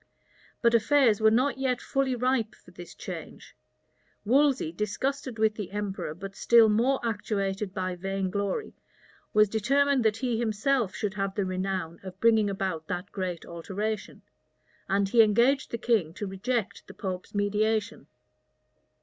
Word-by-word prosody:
But 235 Hz, 0 st, +4 dB
affairs 235 Hz, -1 st, +4 dB
were 220 Hz, -, +6 dB
not 260 Hz, +5 st, +1 dB
yet 255 Hz, -2 st, 0 dB
fully 270 Hz, -2 st, 0 dB
ripe 245 Hz, -2 st, 0 dB
for -, -, -19 dB
this -, -, -11 dB
change. -, -, -9 dB, 0.7 s
Wolsey, 265 Hz, -, +3 dB
disgusted 230 Hz, +7 st, -3 dB
with 220 Hz, 0 st, +3 dB
the 210 Hz, -3 st, -6 dB
emperor, 195 Hz, -6 st, -4 dB
but 195 Hz, +2 st, -8 dB
still 230 Hz, -2 st, +5 dB
more 240 Hz, +6 st, +2 dB
actuated 205 Hz, -3 st, -2 dB
by 185 Hz, -1 st, -3 dB
vain 195 Hz, +1 st, -3 dB
glory, 200 Hz, -, -2 dB, 0.6 s
was 215 Hz, 0 st, +5 dB
determined 270 Hz, +5 st, +2 dB
that 220 Hz, -1 st, +2 dB
he 240 Hz, -2 st, -1 dB
himself 230 Hz, 0 st, 0 dB
should 205 Hz, -2 st, -2 dB
have 195 Hz, -1 st, -3 dB
the 200 Hz, -, 0 dB
renown 185 Hz, -3 st, -3 dB
of 190 Hz, 0 st, -10 dB
bringing 220 Hz, -2 st, +4 dB
about 190 Hz, -5 st, -3 dB
that 180 Hz, +5 st, -4 dB
great 185 Hz, -4 st, -4 dB
alteration; 200 Hz, +5 st, -5 dB, 0.7 s
and 195 Hz, 0 st, +1 dB
he 230 Hz, +2 st, +6 dB
engaged 235 Hz, +6 st, +3 dB
the 235 Hz, -, -3 dB
king 215 Hz, -9 st, 0 dB
to 205 Hz, -, -4 dB
reject 210 Hz, +3 st, -3 dB
the -, -, -12 dB
pope's 185 Hz, -1 st, -5 dB
mediation. 215 Hz, +2 st, 0 dB
210 Hz, 150 wpm, -27 LUFS, 195-235 Hz, 0.7 s, were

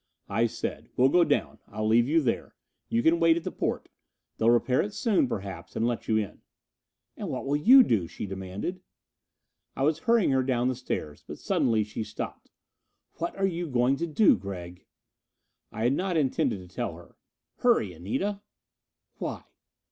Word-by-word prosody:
I 115 Hz, +1 st, +2 dB
said, -, -, -5 dB
"We'll 130 Hz, +2 st, +5 dB
go 175 Hz, +4 st, +5 dB
down, -, -, 0 dB
I'll 110 Hz, +1 st, -3 dB
leave 115 Hz, +2 st, +4 dB
you 160 Hz, +3 st, +3 dB
there. 125 Hz, -5 st, -2 dB, 0.3 s
You 115 Hz, +1 st, +1 dB
can 165 Hz, +1 st, +4 dB
wait 165 Hz, -1 st, +5 dB
at 170 Hz, -, -4 dB
the 185 Hz, -, -4 dB
porte. -, -, -2 dB, 0.5 s
They'll 115 Hz, -, +3 dB
repair 120 Hz, +2 st, +3 dB
it 205 Hz, 0 st, -5 dB
soon, 210 Hz, -, +2 dB
perhaps, 95 Hz, -6 st, -6 dB
and 115 Hz, -, 0 dB
let 120 Hz, -1 st, -2 dB
you 110 Hz, -, +2 dB
in." 105 Hz, -3 st, -3 dB, 0.7 s
"And -, -, -5 dB
what -, -, -4 dB
will 140 Hz, +1 st, 0 dB
you 250 Hz, -, +8 dB
do?" 100 Hz, -, +1 dB
she -, -, -6 dB
demanded. 95 Hz, -, -5 dB, 0.9 s
I 135 Hz, -, -1 dB
was 155 Hz, +2 st, +2 dB
hurrying 230 Hz, -7 st, +3 dB
her 130 Hz, -1 st, +3 dB
down 125 Hz, -1 st, +1 dB
the 130 Hz, -, -1 dB
stairs. 80 Hz, -, -5 dB
But -, -, -7 dB
suddenly 110 Hz, -2 st, +1 dB
she 105 Hz, +1 st, -5 dB
stopped. 110 Hz, 0 st, -7 dB, 0.7 s
"What 170 Hz, -, -3 dB
are 195 Hz, -, +1 dB
you 175 Hz, -2 st, -2 dB
going 125 Hz, -1 st, +2 dB
to 170 Hz, -, -2 dB
do, 185 Hz, +6 st, +5 dB
Gregg?" 90 Hz, -2 st, -8 dB, 0.8 s
I 110 Hz, -, -4 dB
had 120 Hz, +3 st, +3 dB
not 180 Hz, +2 st, -1 dB
intended 120 Hz, -, 0 dB
to -, -, -22 dB
tell -, -, -3 dB
her. -, -, -15 dB, 0.4 s
"Hurry, 230 Hz, -, +2 dB
Anita!" 190 Hz, -, -3 dB, 0.8 s
"Why?" -, -, -4 dB
125 Hz, 180 wpm, -27 LUFS, 105-170 Hz, 0.9 s, you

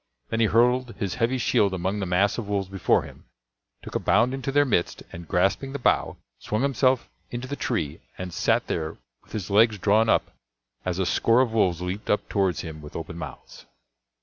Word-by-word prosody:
Then 115 Hz, -, -1 dB
he 115 Hz, -, +4 dB
hurled 125 Hz, +2 st, +2 dB
his 100 Hz, -5 st, -2 dB
heavy 120 Hz, +3 st, +2 dB
shield 100 Hz, -5 st, +2 dB
among 95 Hz, +3 st, -2 dB
the 95 Hz, -, -2 dB
mass 95 Hz, +5 st, +2 dB
of 110 Hz, -, -5 dB
wolves 100 Hz, -2 st, -1 dB
before 95 Hz, -2 st, +2 dB
him, -, -, -13 dB, 0.6 s
took -, -, -9 dB
a -, -, 0 dB
bound 115 Hz, +8 st, +3 dB
into 135 Hz, 0 st, -3 dB
their 145 Hz, +1 st, +4 dB
midst, 105 Hz, -9 st, 0 dB
and 85 Hz, -1 st, -9 dB
grasping 95 Hz, +9 st, +1 dB
the -, -, -2 dB
bough, 125 Hz, -, +1 dB, 0.2 s
swung 110 Hz, +4 st, -2 dB
himself 130 Hz, -2 st, +2 dB, 0.2 s
into 120 Hz, +1 st, -5 dB
the 140 Hz, -, -4 dB
tree 85 Hz, -, -2 dB, 0.2 s
and 90 Hz, -2 st, -6 dB
sat -, -, +1 dB
there 80 Hz, -1 st, -3 dB, 0.2 s
with -, -, -21 dB
his 100 Hz, -3 st, -4 dB
legs 110 Hz, +1 st, +5 dB
drawn 105 Hz, +3 st, +3 dB
up -, -, +2 dB, 0.5 s
as 90 Hz, -1 st, -1 dB
a 95 Hz, -, 0 dB
score 115 Hz, +7 st, +3 dB
of 120 Hz, -4 st, 0 dB
wolves 90 Hz, -6 st, +2 dB
leaped 95 Hz, +4 st, -5 dB
up 105 Hz, -, +1 dB
towards 95 Hz, -3 st, +1 dB
him 80 Hz, -2 st, -8 dB
with 75 Hz, -, -11 dB
open 85 Hz, +1 st, -6 dB
mouths. -, -, -10 dB
105 Hz, 200 wpm, -25 LUFS, 90-120 Hz, 0.6 s, legs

